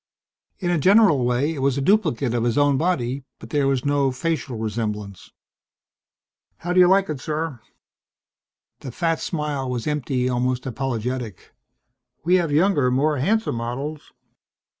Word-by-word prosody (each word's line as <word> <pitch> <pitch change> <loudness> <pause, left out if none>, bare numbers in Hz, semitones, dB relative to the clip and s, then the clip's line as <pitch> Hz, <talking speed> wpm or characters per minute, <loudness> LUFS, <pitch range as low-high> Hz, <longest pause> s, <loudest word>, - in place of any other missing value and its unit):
In 175 -2 -1
a 175 - +1
general 190 - +5
way 125 +6 +1
it 150 - -6
was 135 0 +1
a - - 0
duplicate 145 - +1
of 120 -1 0
his 120 +1 0
own 145 -1 +4
body, 135 -5 -1
but - - -13
there 145 -2 +1
was 135 -1 0
no 140 -2 +2
facial 135 -2 -3
resemblance. 105 -3 -4 1.3
"How 175 +1 -3
do 185 - +4
you 180 - +7
like 195 +1 +4
it, 150 -3 -4
sir?" 155 -2 -3 1.2
The 130 - -7
fat 165 +4 -1
smile 150 -5 -3
was 125 -2 -3
empty, 135 -4 -1
almost 125 0 -1
apologetic. 125 -4 -4 0.7
"We 175 +3 +2
have 170 -4 -1
younger, 150 -4 +3
more 145 +4 +1
handsome 215 - 0
models...." 135 +6 -5
140 Hz, 150 wpm, -22 LUFS, 125-160 Hz, 1.3 s, you